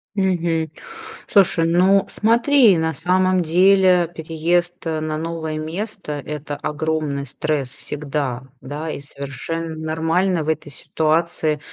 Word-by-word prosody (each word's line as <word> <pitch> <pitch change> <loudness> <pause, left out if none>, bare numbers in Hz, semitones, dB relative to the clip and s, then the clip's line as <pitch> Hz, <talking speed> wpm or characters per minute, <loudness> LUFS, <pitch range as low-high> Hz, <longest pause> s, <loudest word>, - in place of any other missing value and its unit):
Мгм. 170 -4 0 0.6
Слушай, 180 -4 +4
ну 190 +3 +4
смотри, 230 - +4
на 160 0 0
самом 185 +2 +2
деле, 180 +1 +4
переезд 165 +2 0
на 155 -1 -2
новое 160 -1 -4
место- 175 +1 -5
это 150 -1 -5
огромный 150 -2 -2
стресс 140 0 -2
всегда, 140 -1 -4 0.2
да, 150 +4 -5
и 140 - -6
совершенно 145 +4 -5
нормально 160 +2 0
в - - -8
этой 155 -2 -2
ситуации, 155 +1 0
160 Hz, 115 wpm, -21 LUFS, 155-180 Hz, 0.6 s, Слушай